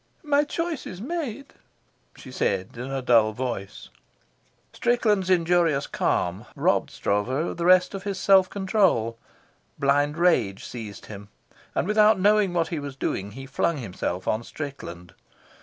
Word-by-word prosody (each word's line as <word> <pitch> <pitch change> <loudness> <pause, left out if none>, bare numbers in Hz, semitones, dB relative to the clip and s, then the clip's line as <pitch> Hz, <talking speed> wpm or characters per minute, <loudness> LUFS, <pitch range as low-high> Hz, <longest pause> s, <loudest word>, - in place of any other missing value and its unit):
"My 295 -1 +3
choice 335 0 -3
is 185 - -8
made," 275 - -5 0.6
she 130 - -12
said, 95 -6 -1
in 125 +3 -6
a 135 -1 -3
dull 115 -3 +4
voice. 115 -5 -5 0.8
Strickland's 215 -6 +1
injurious 170 -5 +2
calm 90 +4 -1
robbed - - +1
Stroeve 105 +3 -1
of 150 +7 -2
the 170 - -2
rest 185 +1 +5
of 195 - -5
his 195 -1 -4
self 190 -1 +5
control. 190 - +1 0.6
Blind 145 +1 +2
rage 140 - +2
seized 110 -5 -8
him, 100 -1 -10 0.5
and - - 0
without 210 -1 +4
knowing 205 0 +4
what 170 -2 0
he 165 - -3
was 140 -2 -7
doing 100 -6 -3
he 135 +3 -8
flung 145 +4 0
himself 95 -6 -4
on 110 - +1
Strickland. 115 - -8
150 Hz, 145 wpm, -25 LUFS, 115-195 Hz, 0.8 s, rest